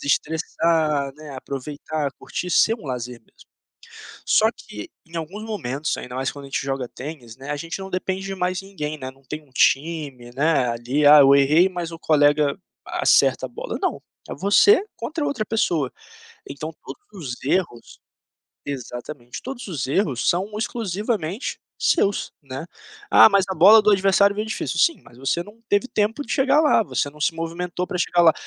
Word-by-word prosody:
desestressar, 155 -1 0
né, 155 -1 -11
aproveitar, 140 +2 -4
curtir, 180 - -6
ser 220 - +4
um 220 -10 -12
lazer 125 -2 -5
mesmo. - - -23 0.8
Só - - +4
que 105 - -10 0.2
em 165 +1 -11
alguns 170 +6 -5
momentos, 155 - -3
ainda 125 - -8
mais 130 +1 -1
quando 140 -1 -10
a - - -10
gente 135 - -2
joga 135 -2 -2
tênis, 130 -5 -9
né, 135 +2 -8
a 145 - -1
gente 165 +5 -5
não 190 0 -7
depende 190 +1 -3
de 195 - -4
mais 185 0 -2
ninguém, 155 -6 -5
né, 130 -2 -6
não 135 +1 -23
tem 150 +4 -6
um 145 - -26
time, 140 -2 0
né, 145 -2 +2
ali 120 +5 -1
"Ah, 150 +1 +10
eu 140 0 +7
errei, 150 +6 +5
mas 175 -3 -5
o 165 - -9
colega 145 -2 +3 0.3
acerta - - +2
a - - -11
bola", - - -6
não, - - -1 0.3
é - - -3
você 285 - +5
contra 310 -1 -4
outra 280 -7 -1
pessoa. 165 - 0 0.6
Então, 155 +3 -6
todos 200 - -10
os 120 - -10
erros 145 -5 -2 0.7
Exatamente, 125 -2 -7
todos 255 -4 -7
os 145 -8 -3
erros 140 - 0
são 185 +4 +1
exclusivamente 210 - -3 0.2
seus, 200 - +1
né. 135 +1 -7 0.5
"Ah, - - +9
mas 200 -2 +3
a - - -1
bola 205 +7 +8
do 210 - +4
adversário 200 +1 +4
veio 215 +1 -3
difícil". 220 - -3
Sim, 335 - +3
mas 120 - -17
você 135 +6 -1
não 215 +5 -16
teve 205 +4 +2
tempo 220 +3 -1
de - - -5
chegar 275 +1 +3
lá, 295 -6 +4
você 145 -7 -2
não 150 +1 -17
se 165 +2 +1
movimentou 170 +2 -4
pra 180 - -4
chegar 175 0 +2
lá. 165 -2 +7
160 Hz, 180 wpm, -22 LUFS, 140-195 Hz, 0.8 s, Ah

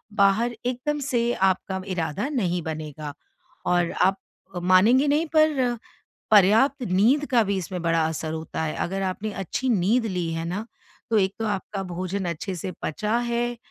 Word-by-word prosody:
बाहर 215 +4 +3
एकदम 255 +4 -1
से 240 -4 0
आपका 190 0 0
इरादा 185 - -2
नहीं 180 - 0
बनेगा। 155 -2 -5 0.5
और 175 -1 +2
आप 195 +1 +2 0.5
मानेंगे 215 +10 +5
नहीं 300 +3 +2
पर 275 -6 +3 0.5
पर्याप्त 225 +7 +5
नींद 240 +11 +3
का 235 -3 +5
भी 200 -1 -1
इसमें 180 0 -4
बड़ा 165 -1 +2
असर 160 0 -4
होता 160 0 -4
है। 155 - -2
अगर 195 +2 -2
आपने 195 +3 -3
अच्छी 195 +7 -3
नींद 225 +3 +2
ली 180 -5 -2
है 165 0 -3
ना, 195 +6 -3 0.4
तो 225 - +3
एक 190 0 +2
तो 225 - -1
आपका 200 -1 -3
भोजन 185 +2 -3
अच्छे 180 +3 -4
से 180 +2 -5
पचा 210 +8 -1
है, 240 0 -1
195 Hz, 160 wpm, -25 LUFS, 180-240 Hz, 0.5 s, मानेंगे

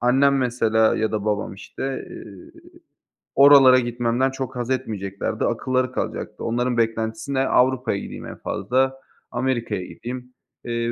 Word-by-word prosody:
Annem 135 +3 +4
mesela 115 -3 +2
ya 110 0 0
da 105 -1 -2
babam, 105 -2 -1
işte, 135 +6 -6
eee, 100 -4 -11 0.9
oralara 135 -2 +8
gitmemden 120 +2 0
çok 135 -1 -5
haz 120 0 -3
etmeyeceklerdi, 105 -7 -2
akılları 130 -1 0
kalacaktı. - - -4
Onların 120 +1 0
beklentisi 115 +2 -1
ne? 135 0 +1
Avrupa'ya 125 -5 +2
gideyim - - -8
en - - -8
fazla, 130 +1 -1 0.3
Amerika'ya 120 -6 -2
gideyim. 125 +1 -8 0.3
Eee, 115 0 -1
125 Hz, 130 wpm, -23 LUFS, 110-130 Hz, 0.9 s, oralara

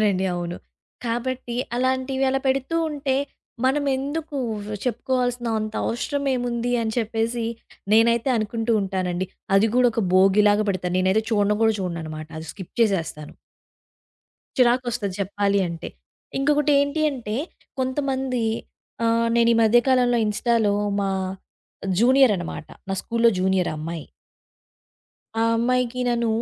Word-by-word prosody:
అవునండి. 195 -3 +2
అవును. 175 0 -4 0.5
కాబట్టి 240 +1 -3 0.2
అలాంటివి 260 +1 0
అలా 270 0 +1
పెడుతూ 270 +4 0
ఉంటే 280 -2 -1 0.5
మనమెందుకు 285 +2 0 0.5
చెప్పుకోవాల్సినా 245 0 -1
అంత 215 0 -4
అవసరమేముంది 245 -2 -1
అని 220 -1 -2
చెప్పేసి 230 +1 -1 0.5
నేనైతే 235 +3 +4
అనుకుంటూ 225 +1 -1
ఉంటానండి. 185 -1 -2 0.3
అది 220 +3 +4
గూడా 250 -1 +5
ఒక 225 0 0
భోగిలాగా 205 +2 +5
పెడతా. 180 -2 -2
నేనైతే 190 +4 +2
చూడను 210 -1 +2
గూడా 220 -1 +4
చూడననమాట. 160 -4 -5
అది 160 - -8
స్కిప్ 190 -4 -10
చేసేస్తాను. 165 -8 -1 1.2
చిరాకొస్తది 240 -5 +2
చెప్పాలి 200 +1 +1
అంటే. 170 -1 -6 0.5
ఇంకొకటి 295 +1 +2
ఏంటి 285 +2 0
అంటే 225 -5 -4 0.4
కొంతమంది 260 -1 -1 0.6
ఆహ్, 230 0 +2
నేనీమధ్య 230 0 +5
కాలంలో 245 -2 +3
ఇన్స్‌టాలో 210 -1 +1 0.3
మా 195 -1 0 0.9
జూనియరనమాట. 235 - +3 0.2
నా 195 - 0
స్కూలులో 235 0 +2
జూనియర్ 185 -1 +1
ఆ - - -4
అమ్మాయి. 160 0 -5 1.4
ఆ - - +3
అమ్మాయికి 250 +1 0
నన్ను 235 -1 +1
230 Hz, 110 wpm, -23 LUFS, 200-255 Hz, 1.4 s, గూడా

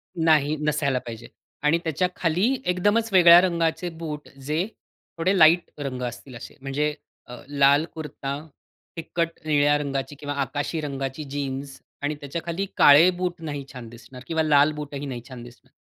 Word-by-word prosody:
नाही, 155 -3 +3
नसायला 145 -3 0
पाहिजे. 115 -2 -9 0.4
आणि 150 +3 +3
त्याच्याखाली 180 - 0
एकदमचं 205 +6 +1
वेगळ्या 175 -1 +9
रंगाचे 170 -1 0
बूट 160 -3 -7 0.2
जे 160 +6 0 0.5
थोडे 185 +4 +1
लाईट 170 +1 +5
रंग 135 -3 -4
असतील 120 +1 -7
असे. 120 - -10
म्हणजे 145 +2 -1 0.4
अ, 125 - -7
लाल 140 +1 +4
कुर्ता, 150 -3 -5 0.6
फिक्कट 165 0 -2 0.2
निळ्या 145 -1 +3
रंगाची 140 -1 -4
किंवा 145 -1 -4
आकाशी 145 +4 -3
रंगाची 135 0 -4
जीन्स 140 -1 -5 0.2
आणि 145 +1 -1
त्याच्याखाली 170 +6 -4
काळे 145 +5 +8
बूट 180 -1 -3
नाही 145 -2 -5
छान 125 -3 -9
दिसणार. 120 +2 -13
किंवा 160 -1 0
लाल 150 -1 +4
बूटही 145 -1 -6
नाही 125 -3 -5
छान 125 -2 -9
दिसणार. 120 0 -16
150 Hz, 150 wpm, -24 LUFS, 135-165 Hz, 0.6 s, वेगळ्या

